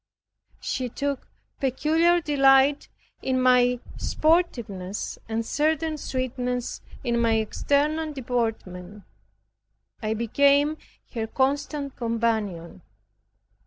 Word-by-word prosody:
She 255 -2 -2
took 280 +2 -3 0.3
peculiar 320 +6 +2
delight 275 -1 +4 0.3
in 260 -1 0
my 250 -1 +4 0.2
sportiveness 235 - 0
and 225 0 -1
certain 310 +4 0
sweetness 250 -3 -3 0.2
in 235 -2 0
my 230 -1 +3
external 290 +8 0
deportment. 220 -7 -3 1.0
I 215 +1 -1
became 280 +6 +3 0.4
her 225 -3 -2
constant 280 +2 -1
companion. 220 -7 -2
255 Hz, 85 wpm, -25 LUFS, 225-285 Hz, 1.0 s, delight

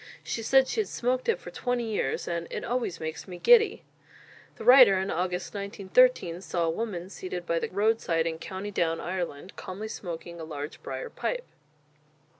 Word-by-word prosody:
She 230 - -3
said 265 +3 +4
she 450 - -2
had 425 - +1
smoked 250 - -1
it 460 - +3
for - - -9
twenty 245 -1 -1
years, 215 -11 -2
and 170 -1 -2
"it - - -4
always 240 -7 -2
makes 160 +3 -5
me 180 -2 -7
giddy!" 445 - +5 0.7
The - - -9
writer, 250 -6 +8
in 190 +1 -1
August 180 +1 -2
1913, 200 -2 +2
saw 175 -3 -1
a 165 - +1
woman 180 -2 -4
seated 180 -2 -5
by 170 0 +1
the - - -3
roadside 200 -5 +1
in 160 -1 -2
County 190 +4 -6
Down, 165 -4 0
Ireland, 175 -1 -4
calmly 200 +4 -6
smoking 170 -3 -7
a - - -5
large 150 -1 -6
briar 480 - -5
pipe. - - -3
190 Hz, 180 wpm, -28 LUFS, 170-240 Hz, 0.7 s, writer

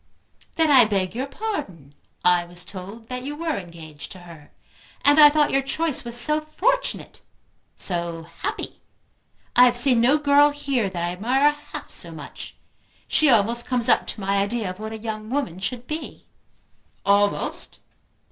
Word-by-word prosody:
"Then 320 -2 +3
I 255 -4 +8
beg 195 -3 -1
your 255 +4 -3
pardon. 275 - -6 0.3
I 180 -1 +4
was 175 +1 -7
told 200 +4 -9
that 250 0 -4
you 285 +3 -5
were 320 -1 -2
engaged 165 -5 -9
to 185 - -13
her. 165 -4 -14 0.6
And 290 +2 +6
I 295 -1 +10
thought 295 0 +2
your 275 - +2
choice 300 +1 -2
was 240 0 -2
so 300 +4 +3
fortunate, 440 +12 -2 0.5
so 170 -2 -3 0.2
happy! 420 +2 -4 0.7
I 250 - +8
have 245 -1 +3
seen 245 -2 +5
no 260 +5 +4
girl 290 0 +5
here 280 -7 -1
that 175 -2 -3
I - - -2
admire 255 +10 +2
half 295 - -10
so - - -1
much. - - -9 0.5
She 310 - +3
almost 235 0 +3
comes 245 -2 +1
up - - +3
to - - -4
my 195 +1 0
idea 200 0 -1
of 185 - -12
what 220 0 -6
a 220 - -5
young 215 -1 -6
woman 255 -10 -2
should 240 +5 -4
be." 310 +4 -7 0.8
"Almost!" 200 0 +1
240 Hz, 165 wpm, -23 LUFS, 195-290 Hz, 0.8 s, I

